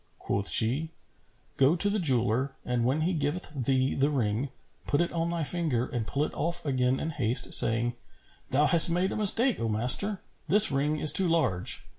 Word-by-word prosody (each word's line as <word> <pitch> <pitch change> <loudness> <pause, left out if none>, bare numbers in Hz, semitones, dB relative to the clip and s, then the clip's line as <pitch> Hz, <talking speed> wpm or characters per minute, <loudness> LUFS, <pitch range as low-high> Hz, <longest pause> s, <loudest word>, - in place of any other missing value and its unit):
Quoth 100 0 -4
she, 130 +8 +1 0.7
"Go 135 +5 +2
to 190 +3 0
the 205 +1 -2
jeweller 130 - -1
and 125 -1 -3
when 135 +6 -2
he 175 +4 -2
giveth 150 +2 -5
thee 130 -1 -2
the 140 +2 -1
ring, 125 -1 -3 0.4
put 145 - -1
it 170 - -2
on 165 0 -3
thy 170 -1 -4
finger 150 -7 -2
and 120 -4 -6
pull 140 - -3
it - - -6
off 170 +1 -4
again 130 -2 -2
in 160 - -5
haste, 120 -5 +1
saying, 115 +2 +5 0.6
'Thou 145 +3 0
hast 165 +3 +6
made 180 +3 -2
a - - -6
mistake, 225 +4 +3
O 115 - -4
master! 125 - +2 0.3
This 210 -1 +6
ring 145 +3 -2
is 150 - +4
too 190 - +5
large. 155 - -3
145 Hz, 190 wpm, -26 LUFS, 125-170 Hz, 0.7 s, hast